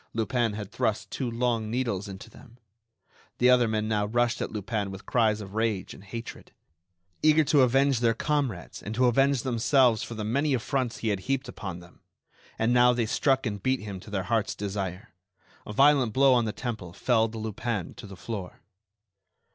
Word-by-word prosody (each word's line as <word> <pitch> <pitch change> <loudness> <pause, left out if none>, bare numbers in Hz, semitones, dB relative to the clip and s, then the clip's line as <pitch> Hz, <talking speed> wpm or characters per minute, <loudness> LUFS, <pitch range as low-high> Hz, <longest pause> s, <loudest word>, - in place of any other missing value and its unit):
Lupin 115 0 0
had 105 0 -6
thrust 105 -2 -1
two 130 -3 -2
long 115 -2 -1
needles 115 -5 -2
into 95 0 -9
them. 120 -2 -17 0.8
The 125 +1 +5
other 125 -2 +5
men 110 -1 -1
now 105 -2 0
rushed 120 +2 +1
at - - -3
Lupin 105 -1 -3
with 95 +1 -9
cries 110 -3 +2
of 100 -1 -9
rage 110 -3 -1
and - - -13
hatred, 115 +3 -8 0.7
eager 155 0 +5
to 145 -1 +4
avenge 135 +1 +3
their 115 -1 +2
comrades 135 - -2
and 105 +2 -6
to 125 +2 +3
avenge 135 +1 +3
themselves 125 -1 +3
for 115 - -6
the 110 - -4
many 135 +6 +1
affronts 125 0 -2
he 115 - -2
had 100 -2 0
heaped 135 0 0
upon 90 -4 -7
them; 85 -1 -18 0.6
and 115 +2 +2
now 125 0 +5
they 120 -2 0
struck 135 +4 +1
and 105 -3 -3
beat 130 +4 0
him 100 -3 -6
to 100 - -13
their 100 -2 -2
heart's 110 +2 0
desire. 100 0 -5 0.5
A - - -5
violent 135 -2 +4
blow 135 0 +5
on 120 -2 +3
the 110 - -1
temple 110 -7 -6
felled 115 0 +1
Lupin 110 -2 -3
to - - -10
the 95 -1 -11
floor. 100 -2 -6
115 Hz, 185 wpm, -27 LUFS, 105-125 Hz, 0.8 s, The